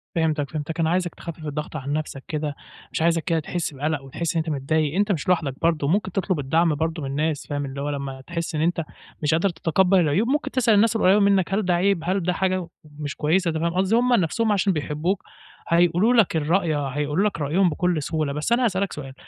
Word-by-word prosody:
فهمتك، 155 -4 0
فهمتك. 155 +2 -4
أنا 160 -1 +2
عايزك 175 0 0
تخفِّف 165 -2 -8
الضغط 150 +1 -5
عن 140 -1 -3
نَفسك 150 -3 -4
كده، 150 -2 -3 0.4
مش - - -2
عايزك 165 -1 +2
كده 165 -1 +1
تحِس 160 0 -3
بَقلَق 145 +1 -2
وتحِس 165 +5 -3
إن 165 - +2
أنت - - -3
متضايق، 150 +3 0
أنت 205 +1 +2
مش 165 -7 -2
لوحدك 165 -7 +1
برضه، 160 -4 +1
ممكن 190 +3 +1
تطلُب 185 -2 -1
الدعم 160 +3 +2
برضه 160 0 -2
من 135 - -3
الناس، 150 +1 -2
فاهم؟ 145 -1 -2
اللي 140 +1 -6
هو 145 - -2
لمّا 140 -2 -5
تحِس 170 +2 -4
إن 155 - 0
أنت 165 0 +1 0.4
مش 150 - +2
قادر 170 +5 +2
تتقبَّل 180 +3 +2
العيوب، 170 +7 +2
ممكن 295 +4 0
تسأل 240 -4 +3
الناس 225 +2 +4
القريّبة 200 -1 +4
منّك 195 -2 +2
هل 205 -1 +1
ده 180 - +2
عيب؟ 190 +1 +2
هل 185 +1 0
ده 180 - +1
حاجة 185 -2 -1 0.3
مش 145 -2 -4
كويسة، 170 +4 +1
أنت 160 - -2
فاهم 170 +1 -1
قصدي؟ 190 +4 +2
هم 245 +1 +3
نَفسهم 220 +2 +2
عشان 195 -1 +2
بيحبّوك، 155 +5 -2 0.4
هيقولوا 175 +7 +3
لك 225 -8 +3
الرأي، 160 +1 +1
هيقولو 145 +5 -1
لك 205 -6 -1
رأيهم 175 +6 +2
بكل 170 0 0
سهولة، 155 -2 -1
بس 150 +10 -3
أنا 245 +2 +3
هاسألك 195 -2 0
سؤال، 135 -3 -7
165 Hz, 220 wpm, -23 LUFS, 150-190 Hz, 0.4 s, الناس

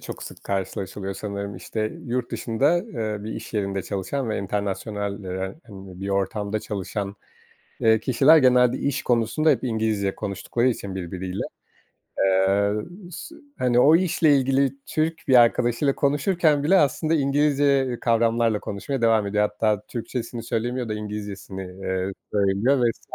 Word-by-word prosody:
çok - - -8
sık - - -10
karşılaşılıyor 95 0 -3
sanırım. 100 -2 -5
İşte, 110 +3 -3
yurt 120 0 -2
dışında, 135 +8 +1
ııı, 110 - -4
bir 110 - -4
iş - - -8
yerinde 100 -2 -1
çalışan 110 +8 -3
ve 110 - -1
internasyonal 100 0 -3
denen, 95 - -5
hani, 95 -4 -11
bir 100 - -4
ortamda 100 +2 -1
çalışan, 100 0 -4 0.6
eee, 110 0 +4
kişiler 135 +7 +5
genelde 125 -2 +4
iş 140 -1 -1
konusunda 120 +6 +2
hep 135 -6 +2
İngilizce 110 -5 0
konuştukları 105 +4 -1
için 100 -6 -2
birbiriyle. 95 +1 -4 0.8
Eee, 95 +1 +3 0.4
sı 320 - -9 0.2
hani, 125 -1 +3
o 155 +5 +7
işle 165 -4 +3
ilgili 135 0 +2
Türk 160 0 -2
bir 130 - +5
arkadaşıyla 120 +3 +2
konuşurken 145 +1 +2
bile 190 +5 +5
aslında 155 +2 +2
İngilizce 140 -3 +2
kavramlarla 115 -2 +2
konuşmaya 120 +6 -4
devam 110 -2 +3
ediyor. 105 +1 +1
Hatta 105 -1 0
Türkçesini 120 0 -5
söylemiyor 120 +2 -2
da 110 - -2
İngilizcesini, 105 -2 -6
ııı, 95 +1 -3 0.2
söylüyor 100 +7 +2
vs. - - -10
110 Hz, 140 wpm, -24 LUFS, 100-135 Hz, 0.8 s, o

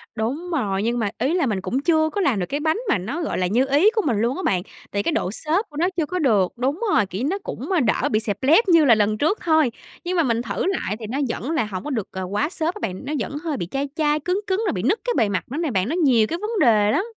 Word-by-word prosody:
Đúng 275 +11 -3
rồi, 205 - -1
nhưng 240 +2 0
mà 215 -3 0
ý 265 +7 0
là 350 -4 +2
mình 210 -6 -1
cũng 250 +7 -1
chưa 315 +1 +2
có 405 +4 -2
làm 250 - +2
được 180 - -1
cái 285 +10 -3
bánh 315 +3 +1
mà - - +3
nó, 240 - -4
gọi 315 - -2
là, 185 - +1
như 235 +8 +2
ý 295 +10 +5
của 435 - +3
mình 235 -7 +1
luôn 240 +3 +1
á 375 - -4
bạn, 190 - +1 0.3
tại 200 0 -1
cái - - 0
độ 190 - -1
xốp 320 - -1
của 295 - -11
nó 350 +4 +2
chưa 325 - +1
có 365 +4 -3
được 210 - +2
đúng 270 - -1
rồi, 210 - +4
kiểu 190 +4 -6
như, 270 - 0
nó 390 - -1
cũng - - -6 0.2
đỡ 215 - +1
bị 215 - +3
xẹp 205 -3 -3
lép 325 - +5
như 330 -3 +6
là 240 -5 +6
lần 215 0 +1
trước 315 - +1
thôi, 315 -6 +3 0.3
nhưng 360 +1 -2
mà 335 - +4
mình 230 -4 0
thử 200 -5 -3
lại 360 - -1
thì 225 - -6
nó 260 +6 -3
vẫn 255 +5 -3
là 315 -9 +1
hổng 195 -3 -6
có 295 - -5
được, 230 -9 -2
à, 190 - -5
quá 205 +9 -1
xốp 335 0 -2
á - - -8
bạn, 185 +8 -4
nó 290 - -3
vẫn 285 - -4
hơi 315 -4 -2
bị 175 - -4
chai 275 +1 -2
chai, 300 -1 +1
cứng 360 +6 -1
cứng 380 +2 0
rồi - - 0
bị 180 - -3
nứt 345 - +2
cái - - +1
bề 210 - +3
mặt 185 - -1
nữa 280 - -3
nè 325 -4 -1
bạn, 190 0 0
nó 320 - -1
nhiều 255 -11 +3
cái 335 - -3
vấn 430 0 -2
đề 215 - +4
lắm. 375 - +1
275 Hz, 310 wpm, -22 LUFS, 215-330 Hz, 0.3 s, như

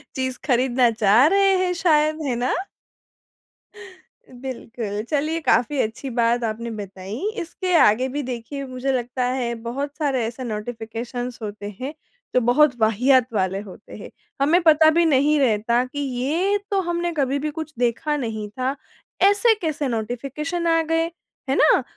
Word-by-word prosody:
चीज़ 260 -1 -2
खरीदना 250 -2 +3
चाह 220 +2 +4
रहे 390 +2 +4
हैं 360 - 0
शायद, 310 -3 +2
है 240 - 0
ना? 245 +2 0 1.8
बिल्कुल। 235 -5 -6
चलिए, 305 +2 0
काफ़ी 255 0 +2
अच्छी 225 +5 -4
बात 235 0 +1
आपने 230 +1 -3
बताई। 200 +1 -7 0.2
इसके 365 +2 -3
आगे 255 -3 +4
भी, 290 +3 -3
देखिए, 255 +3 -5
मुझे 255 +1 -3
लगता 250 0 -2
है, 250 -1 -1
बहुत 265 +6 -5
सारे 275 -6 0
ऐसे 235 +3 -5
नोटिफिकेशन्स 235 +2 -5
होते 205 -1 -6
हैं, 275 +4 -4 0.4
जो 250 - +5
बहुत 255 +3 +4
वाहियात 245 +3 +3
वाले 190 -1 0
होते 205 0 -12
हैं। 210 - -9 0.3
हमें 330 +6 +4
पता 315 -1 +6
भी 340 - +5
नहीं 295 0 +3
रहता 235 -1 +2
कि 285 +3 -7
ये 285 +10 0
तो 395 - +2
हमने 345 0 -2
कभी 275 0 +1
भी 305 +2 -2
कुछ 315 0 -7
देखा 245 +5 0
नहीं 220 -5 -4
था। 255 +5 -2 0.5
ऐसे 445 +3 +4
कैसे 305 -3 -1
नोटिफिकेशन 275 +9 -3
आ 330 0 +3
गए। 325 +1 0 0.4
है 270 - +2
ना? 300 -3 +4
255 Hz, 155 wpm, -22 LUFS, 235-305 Hz, 1.8 s, पता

